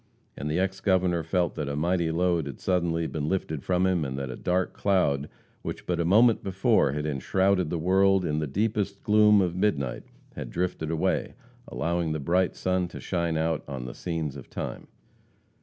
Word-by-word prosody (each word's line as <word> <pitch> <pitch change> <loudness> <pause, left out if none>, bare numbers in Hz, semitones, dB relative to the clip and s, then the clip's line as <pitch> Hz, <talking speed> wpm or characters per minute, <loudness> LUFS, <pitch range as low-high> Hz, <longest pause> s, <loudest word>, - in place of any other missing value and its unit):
And 75 - -4
the 75 - 0
ex 95 +1 -1
Governor 90 -3 +2
felt 85 +2 0
that 75 -2 -3
a 70 - -2
mighty 85 +2 +1
load 85 -2 +1
had 70 - -7
suddenly 85 -3 0
been 75 -1 -3
lifted 80 -6 -2
from 90 0 +1
him, 90 -4 +1
and 65 -1 -4
that 70 -2 -4
a - - -5
dark 90 +1 -1
cloud, 75 -8 +1 0.3
which - - -6
but 90 -1 -1
a 85 - +1
moment 110 +6 +5
before 95 -7 +2
had 75 +1 -3
enshrouded 90 +5 +1
the 85 - -1
world 95 +2 +3
in 75 -1 0
the 75 - -2
deepest 100 +4 -1
gloom 105 -1 +5
of 90 -2 -1
midnight, 80 -10 0 0.3
had - - -6
drifted 90 -3 -2
away, 80 -1 -1 0.3
allowing 85 -1 -1
the 80 - -2
bright 90 +6 +1
sun 90 -1 0
to - - -9
shine 85 -3 -1
out 80 0 0
on 65 -3 -5
the - - -6
scenes 80 -5 -3
of 70 - -10
time. - - -6
85 Hz, 190 wpm, -27 LUFS, 75-95 Hz, 0.3 s, moment